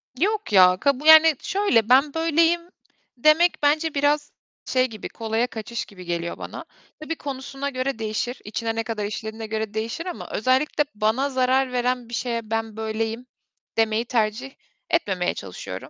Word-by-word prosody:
Yok 415 - -1
ya, 185 -1 +7
kabu 280 +1 +1
yani, 315 -1 +8
şöyle, 265 - +1
"Ben 275 +3 +5
böyleyim." 330 +1 +2 0.6
demek 310 +6 +4
bence 305 +2 +2
biraz 290 +1 +1 0.3
şey 255 0 +2
gibi, 215 -3 -8
kolaya 225 +2 -1
kaçış 230 0 -5
gibi 185 -4 -13
geliyor 170 0 -3
bana. - - -8 0.3
Tabii 320 +1 -4
konusuna 275 0 -5
göre 255 -2 -3
değişir, 220 +3 -3
içine 225 +2 -3
ne 225 - -1
kadar 220 -2 -3
işlediğine 220 +1 -5
göre 220 -1 -3
değişir 225 +9 -3
ama 360 - -6
özellikle 260 +6 +1
bana 220 +6 +1
zarar 260 0 +1
veren 250 -1 -1
bir 240 - -11
şeye 230 -1 -3
ben 225 -1 -2
böyleyim 220 +2 -3 0.5
demeyi 225 +1 +2
tercih 235 +2 -1 0.4
etmemeye 190 - 0
çalışıyorum. 95 -2 -8
245 Hz, 150 wpm, -23 LUFS, 220-285 Hz, 0.6 s, yani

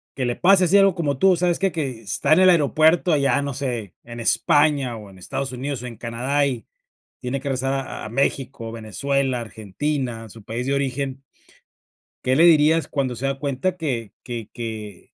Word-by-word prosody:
que 130 - -2
le 120 0 -1
pase 190 +1 +5
así, 195 +4 +4
algo 195 -2 +4
como 145 -6 -1
tú, 190 -1 +5
¿sabes?, 175 0 +1
que 195 -1 +1
que 135 -8 -4
está 110 - +1
en 175 - +5
el 185 0 +7
aeropuerto, 160 +1 +4
allá, 140 -1 +2
no 140 -1 -3
sé, 120 - -4
en 120 0 -9
España, 135 +2 +2
o 105 -2 -11
en 95 - -16
Estados 135 +8 -4
Unidos, 130 0 -4
o - - -5
en 115 - -8
Canadá, 125 +6 -1
y 125 -6 -4 0.5
tiene 125 +2 -3
que - - -16
regresar 135 +1 -1
a 135 -4 -4
a - - -6
México, 130 -2 -2
Venezuela, 125 +4 -1
Argentina, 115 +3 -4
a - - -13
su 110 +1 -13
país 120 +5 -4
de 140 - +1
origen. 135 0 -2 1.0
¿Qué 130 +1 +2
le 165 - +6
dirías, 160 -1 +5
cuando 130 -4 -2
se 130 +4 -3
da 135 0 -1
cuenta 140 +6 -2
que 125 - -3
que 120 -4 -6
que? 110 -5 -7
135 Hz, 200 wpm, -22 LUFS, 115-150 Hz, 1.0 s, el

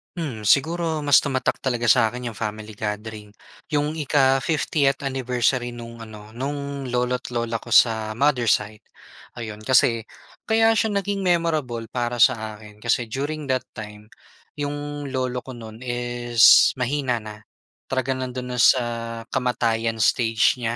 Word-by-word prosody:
Hmm, 135 -11 -5
siguro 160 - +2
mas 145 -2 +4
tumatak 130 -2 0
talaga 120 -2 -1
sa'kin 120 +2 +3
'yong 115 - -6
family 110 0 -5
gathering. 105 0 -5 0.4
'Yong 150 +1 0
ika 135 -4 +2
50th 145 -1 +1
anniversary 125 -1 0
nung 115 -1 -9
ano, 110 0 -12
nung 140 +1 -4
lolo't 125 0 -1
lola 115 -1 -2
ko 120 - -11
sa 110 -2 +4
mother 130 +2 +1
side. 105 -1 0 0.6
Ayon, 110 -2 -7
kasi, 115 -2 +3 0.4
kaya 225 0 +3
siya 220 0 +1
naging 200 0 -3
memorable 155 -10 0
para 120 0 -3
sa 110 -2 +2
akin 105 -1 -15
kasi 120 0 +1
during 145 +5 -4
that 130 -1 0
time, 105 0 -10 0.5
'yong 145 0 -4
lolo 130 -1 -1
ko 130 0 -10
nun 110 -1 -10
is 120 -1 +4
mahina 125 -2 -1
na. 105 0 -8 0.5
Talaga 130 0 -1
nando'n 130 -1 -4
na 125 - -3
sa 125 0 +5 0.5
kamatayan 115 -3 0
stage 115 +1 +3
niya. 115 -1 -2
125 Hz, 140 wpm, -23 LUFS, 115-140 Hz, 0.6 s, sa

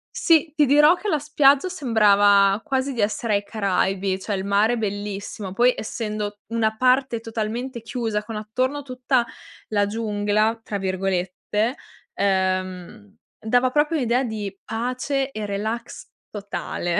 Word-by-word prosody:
Sì, 320 -3 +3
ti 300 -2 +4
dirò 295 +4 +6
che 410 - -7
la 315 - +2
spiaggia 295 +2 +3
sembrava 205 - +4
quasi 270 -2 -1
di 235 - -2
essere 215 +2 0
ai 200 0 +1
Caraibi, 195 -2 -1
cioè 200 +1 -3
il 190 0 -4
mare 210 +4 +2
bellissimo. 205 -2 -4
Poi 245 +4 +4
essendo 210 -2 -4
una 220 -1 0
parte 255 0 +2
totalmente 230 +3 -4
chiusa, 225 -2 -3
con 220 +1 -7
attorno 255 +7 -2
tutta 255 -1 0 0.4
la 205 -2 +1
"giungla" 215 +1 0
tra 205 - -4
virgolette, 195 +5 -2 0.4
ehm, 190 +1 -2 0.2
dava 245 +3 +2
proprio 300 +3 +2
un'idea 250 -1 +1
di 215 -5 -4
pace 255 +4 -2
e 215 -4 -5
relax 220 +4 -4 0.2
totale. 200 -4 -3
220 Hz, 135 wpm, -23 LUFS, 205-255 Hz, 0.4 s, dirò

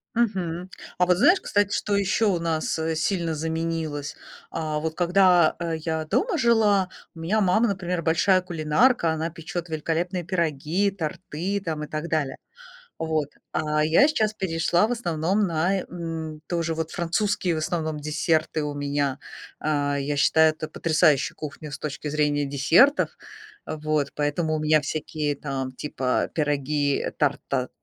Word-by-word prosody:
Мгм. 185 -6 -1 0.3
А 180 - +4
вот 180 0 +3
знаешь, 350 - +5
кстати, 205 0 +1
что 205 -1 0
еще 200 +3 +1
у 185 -5 +2
нас, 160 -1 -1
э, 160 0 -1
сильно 165 0 0
заменилось? 160 -2 -3 0.3
А, 155 -2 -2
вот 160 0 -3
когда, 180 -1 +4
э, 170 -1 -2
я 160 0 -3
дома 380 - 0
жила, 215 -6 +3 0.3
у - - -11
меня 195 +7 +1
мама, 215 +5 +3
например, 180 -3 -2
большая 185 +4 +3
кулинарка, 170 - +2
она 160 +1 -2
печет 170 +1 -6
великолепные 170 +3 -2
пироги, 170 +2 0
торты 185 +2 -3
там, 155 -2 -3
и - - -6
так 155 +2 -4
далее. 150 -4 -1 0.6
Вот, 155 -3 -1 0.2
а 150 -1 +1
я 170 - +5
сейчас 215 -8 +1
перешла, 175 +2 +1
в - - -1
основном, 190 -1 0
на, 175 +4 +1
э, - - -4
м, 165 -3 -5
тоже 165 -2 -1
вот 160 0 -3
французские, 175 +1 0
в - - -2
основном, 155 -2 -2
десерты 155 +1 0
у 145 -1 -3
меня. 145 -1 -1 0.4
А, 145 -2 0
я 145 +1 -2
считаю 160 +2 +5
это 155 0 -6
потрясающая 155 -3 +2
кухня 155 0 -7
с - - -6
точки 150 0 -5
зрения 145 -1 +1
десертов. 160 - +3 0.5
А 155 - -4
вот, 155 -2 -1
поэтому 155 +2 0
у - - -2
меня 155 0 +4
всякие 150 0 -3
там 135 -2 -4
типа 130 -1 -1
пироги, 145 -1 0
тарт, 145 -2 +1
а, 130 -2 0
160 Hz, 155 wpm, -25 LUFS, 150-180 Hz, 0.6 s, знаешь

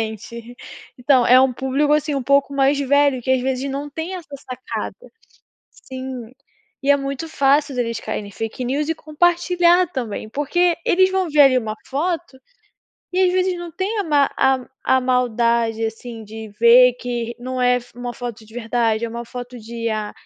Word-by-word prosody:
Exatamente. 225 +2 -7 0.4
Então 250 -1 +3
é 255 +1 +7
um 260 -1 +3
público, 270 +4 0
assim, 300 0 +1
um 275 - -1
pouco 280 +2 +2
mais 275 +1 +3
velho 280 -1 +2
que 260 - -2
às 260 - +3
vezes 265 +1 -2
não 280 +2 -4
tem 325 +5 -5
essa 355 -3 -8 0.2
sacada. 255 0 -5 0.8
Sim, 260 -3 -8 0.5
e 275 - 0
é - - +6
muito 275 +3 -4
fácil 280 -1 +2
eles 230 -2 -2
cair 215 -1 -4
em 200 - -11
fake 225 +5 -5
news 285 +4 -1
e 325 - 0
compartilhar 350 +3 +2
também, 220 -4 -5
porque 340 +7 +1
eles 375 +1 +4
vão 380 -3 0
ver 295 0 +5
ali 270 -2 +6
uma 220 -3 -3
foto 325 0 -2 0.8
e 370 - +1
às 365 -1 +3
vezes 370 0 +1
não 345 -1 -7
tem 400 +6 -2
a 400 - -2
ma 290 -3 +2
a 265 -1 +2 0.2
a 260 - +3
maldade, 235 -2 +1
assim, 225 0 -6
de 220 +1 -9
ver 245 +1 +7
que 240 -1 -4
não 255 +1 -4
é 250 0 +4
f 245 -1 -9
uma 245 0 -5
foto 235 -3 -7
de 220 - -18
verdade, 230 -1 0
é - - -2
uma 235 +1 -6
foto 245 +1 -8
de 230 +1 -8
IA. 215 -2 -2
255 Hz, 185 wpm, -20 LUFS, 235-290 Hz, 0.8 s, é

